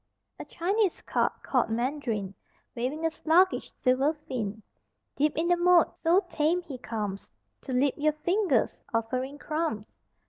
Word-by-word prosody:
A - - -6
Chinese 390 +2 0
carp - - -1
(called 250 -4 +1
Mandarin) 230 -5 -2 0.4
Waving 265 +7 -2
a 325 - +2
sluggish 340 +4 +2
silver 265 +4 +2
fin 220 -8 -5 0.5
Deep 295 +1 +1
in 330 +2 +1
the 350 - +4
moat: 350 -1 +4
so 355 +4 +3
tame 340 +1 +1
he 275 -7 -8
comes 210 -5 -4 0.3
To 270 - -7
lip 260 +2 +2
your 305 +1 +2
fingers 355 +6 +1
offering 255 +5 -2
crumbs. 305 -9 -3
295 Hz, 140 wpm, -28 LUFS, 245-335 Hz, 0.5 s, the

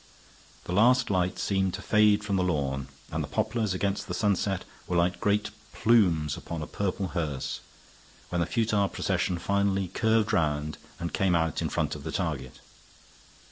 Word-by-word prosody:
The 90 - -4
last 125 +4 +4
light 90 -1 +1
seemed 95 -2 0
to 105 - -7
fade 105 -1 +4
from 100 -1 -1
the 95 - +2
lawn, 70 -6 -1 0.2
and - - -1
the - - -5
poplars 110 -3 -1
against 100 +1 -1
the - - -3
sunset 100 -2 0 0.2
were 90 - 0
like 90 +2 +2
great 105 0 +1 0.2
plumes 90 - +3
upon 80 -2 -5
a - - -4
purple 95 0 -2
hearse, 75 -6 -3 0.7
when 90 -1 0
the 85 - 0
futile 105 -1 +1
procession 90 -1 -1
finally 100 +1 0
curved 110 +2 +2
round, 75 -1 0 0.2
and 85 - -4
came 95 -2 +2
out 80 -2 0
in - - -1
front - - -1
of - - -7
the - - -4
target. 70 -7 -3
95 Hz, 170 wpm, -28 LUFS, 85-105 Hz, 0.7 s, last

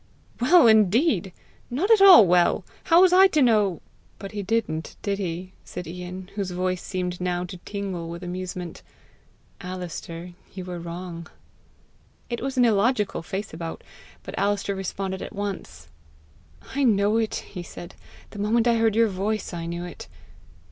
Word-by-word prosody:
"Well 315 +7 +6
indeed! 220 - +4 0.4
Not 330 - 0
at 440 -3 +6
all 370 - +10
well! 175 -1 +3 0.2
How 335 +1 +6
was 370 -1 +6
I 380 +1 +8
to 310 -5 +1
know 210 -8 +2 0.2
" - - -34
"But 195 - -8
he 210 -2 -4
didn't 195 -6 -2
did 200 -1 -1
he?" 185 0 -4
said 180 - -7
Ian, 180 +2 -8
whose 200 -2 -3
voice 185 0 -2
seemed 180 -2 -4
now 180 -1 -1
to 180 +1 -7
tingle 185 -3 -5
with 170 +2 -7
amusement. 180 -1 -6 0.4
" - - -25
Alister, 175 -1 -7 0.2
you 185 -2 -6
were 180 -1 -6
wrong." 170 0 -7 1.0
It 235 - -3
was 270 +1 -3
an 245 - +5
illogical 215 -2 +1
face 195 +3 -5
about, 165 0 -6 0.4
but - - -8
Alister 200 0 0
responded 190 0 -4
at - - -7
once. 185 - -5 0.9
"I 280 +1 0
know 210 -2 +3
it," 225 -1 0
he 180 - -7
said. 175 +1 -10 0.4
"The 205 - -9
moment 225 +3 +2
I 235 -1 +4
heard 225 -2 +2
your 230 0 +4
voice, 205 +1 -2
I 170 -1 -4
knew 170 +1 -4
it. 175 - -9
195 Hz, 165 wpm, -25 LUFS, 180-225 Hz, 1.0 s, all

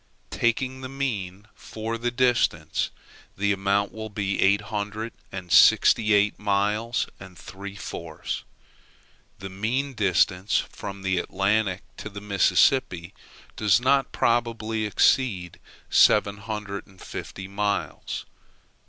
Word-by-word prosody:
Taking 130 +3 0
the 130 - -6
mean 105 -8 -4
for 110 +1 -5
the 120 +1 -1
distance, 120 -10 +1 0.5
the 100 +1 +1
amount 100 +1 +1
will 110 0 -7
be 100 -1 -2
eight 100 +2 +4
hundred 105 +2 -4 0.2
and 90 -3 -7
sixty 110 +5 +6
eight 105 +1 +2
miles 105 +3 0
and 95 -2 -12
three 100 +4 -9
fourths. 85 -5 -6 0.9
The 95 -1 -8
mean 125 +8 -2
distance 95 - +2
from 100 -1 -5
the 95 -1 +1
Atlantic 100 0 0
to 110 - -7
the 100 0 -8
Mississippi 100 - +2 0.4
does 105 0 +3
not 135 +1 +2
probably 115 -2 0
exceed 95 -5 +1 0.3
seven 105 -1 +5
hundred 100 -1 -6
and 95 -2 -20
fifty 95 0 -7
miles. 100 +1 -3
100 Hz, 120 wpm, -25 LUFS, 95-115 Hz, 0.9 s, sixty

